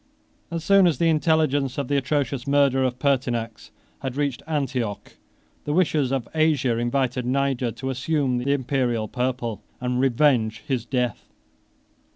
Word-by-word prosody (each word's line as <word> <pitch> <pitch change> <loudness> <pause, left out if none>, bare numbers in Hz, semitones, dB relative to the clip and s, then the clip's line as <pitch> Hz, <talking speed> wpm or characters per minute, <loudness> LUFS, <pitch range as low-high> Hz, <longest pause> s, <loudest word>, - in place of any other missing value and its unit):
22 170 - -6
As 165 - -3
soon 195 -1 +5
as 160 -6 +1
the 165 +3 +2
intelligence 155 -4 +1
of 140 -3 -2
the 145 - 0
atrocious 140 -2 -1
murder 140 -2 +3
of 125 -1 -1
Pertinax 125 -5 -1 0.3
had 130 -2 -4
reached 140 -4 -1
Antioch, 130 -9 -3 0.5
the 145 - -1
wishes 155 -6 +2
of 130 -3 -1
Asia 150 -7 +2
invited 125 +1 0
Niger 130 -1 0
to 130 +1 -4
assume 130 -1 0
the 135 +3 -1
Imperial 125 -5 0
purple 125 -3 -2 0.2
and 125 0 -1
revenge 120 -5 +2
his 130 -5 -1
death. 125 -3 -2
130 Hz, 150 wpm, -24 LUFS, 125-145 Hz, 0.5 s, soon